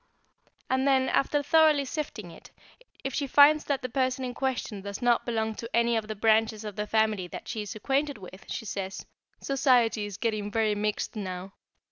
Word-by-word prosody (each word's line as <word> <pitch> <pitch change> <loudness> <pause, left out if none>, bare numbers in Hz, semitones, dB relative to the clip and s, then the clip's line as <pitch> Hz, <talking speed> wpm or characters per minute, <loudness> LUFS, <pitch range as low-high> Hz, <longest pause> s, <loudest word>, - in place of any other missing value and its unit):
And 260 +1 +1
then, 265 -1 +3
after 290 +1 +1
thoroughly 305 -1 +4
sifting 250 - -5
it, - - -14 0.5
if 270 - -3
she 280 +2 -1
finds 295 +3 +6
that 275 -2 -1
the - - -1
person 255 0 -1
in 250 - -4
question 250 -6 -3
does 200 0 -6
not 245 -1 +2
belong 220 -2 -1
to 230 +2 -7
any 235 0 +3
of 220 -1 -1
the 215 - -4
branches 220 0 +2
of 210 -2 -6
the 210 0 -3
family 215 -4 +1
that - - -9
she 220 - -3
is 210 0 -6
acquainted 275 +6 -1
with, 185 -1 -12
she - - -4
says 195 -2 -5 0.4
"Society 245 -6 +2
is 200 -2 -8
getting 215 -2 -2
very 215 0 +1
mixed 210 +2 -2
now." 190 -2 -5
225 Hz, 190 wpm, -28 LUFS, 210-265 Hz, 0.5 s, finds